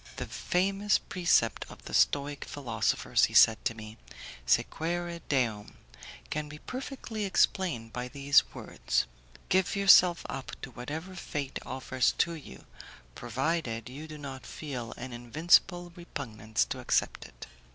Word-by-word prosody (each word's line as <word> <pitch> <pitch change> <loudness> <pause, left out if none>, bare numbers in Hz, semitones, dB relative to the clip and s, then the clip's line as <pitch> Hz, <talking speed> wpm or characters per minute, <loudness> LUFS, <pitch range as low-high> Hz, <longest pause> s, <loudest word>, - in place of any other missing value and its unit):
"The - - -4
famous 195 +3 +1
precept 175 -10 +1
of - - -13
the - - -8
Stoic 145 0 +2
philosophers," 120 -6 +1
he - - -7
said 110 -1 +7
to 115 - 0
me, 110 0 -10 0.5
"'Sequere 170 - 0
Deum', 115 -7 0 0.6
can 150 0 -2
be 150 - -9
perfectly 255 - -6
explained 175 - +1
by 125 0 -3
these 140 +1 +3
words: - - -1 0.4
'Give 190 +2 +2
yourself 185 -3 +6
up 135 - -6
to 130 - -6
whatever 155 +10 -6
fate 145 -6 -4
offers 130 0 0
to 170 - +2
you, 140 - -11 0.5
provided 120 - -2
you 145 +5 -8
do 155 -1 -8
not 135 -3 -7
feel 125 -7 -6
an 125 +1 -7
invincible 170 +8 +2
repugnance 110 -10 -3
to - - -5
accept - - 0
it. - - -12
145 Hz, 135 wpm, -30 LUFS, 120-175 Hz, 0.6 s, said